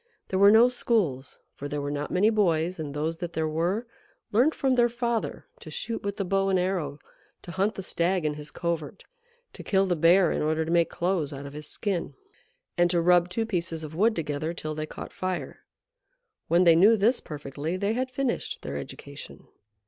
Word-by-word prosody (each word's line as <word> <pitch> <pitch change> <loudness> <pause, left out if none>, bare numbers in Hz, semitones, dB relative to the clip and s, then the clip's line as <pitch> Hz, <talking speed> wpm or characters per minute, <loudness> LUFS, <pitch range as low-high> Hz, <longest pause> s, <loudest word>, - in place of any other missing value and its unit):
There 190 - 0
were 200 +1 +8
no 225 +3 +7
schools, 200 - 0 0.2
for 145 - -6
there 145 0 -3
were 145 0 -3
not 145 0 -3
many 205 +5 +3
boys, 175 -5 +1
and 150 -2 -4
those 160 +2 -2
that 175 -1 -5
there 160 -1 0
were 175 +9 -1 0.5
learnt 250 +9 +3
from 265 -1 +1
their 240 -1 +4
father 235 -1 -2
to 470 - -10
shoot 230 -1 -4
with 200 0 -3
the 195 - -2
bow 195 +1 +1
and 190 - +3
arrow, 180 -6 -1 0.5
to 175 - -8
hunt 195 +4 0
the 195 - -5
stag 175 -1 0
in 150 - +1
his 150 0 -8
covert, 170 -2 -4 0.5
to - - -9
kill 195 -1 +2
the 180 -2 +1
bear 170 +2 +5
in - - -1
order 155 +1 0
to 165 - -3
make 170 -1 +3
clothes 170 -5 -1
out 140 +1 -7
of 140 - -8
his 150 0 -8
skin, 195 -1 -3 0.6
and 175 0 +5
to 175 -1 +2
rub 175 +1 +4
two 225 +5 -1
pieces 170 -6 -3
of 155 0 -7
wood 215 +7 +2
together 155 +1 -3
till 155 -1 -4
they 155 0 -4
caught - - -9
fire. 185 -1 -4 0.9
When 170 +2 +4
they 170 -2 +7
knew 205 +7 +6
this 220 +6 +3
perfectly, 150 +2 -5
they 200 +3 0
had 255 +2 -1
finished 260 -1 -2
their 70 0 -4
education. 70 - -9
175 Hz, 205 wpm, -27 LUFS, 155-200 Hz, 0.9 s, were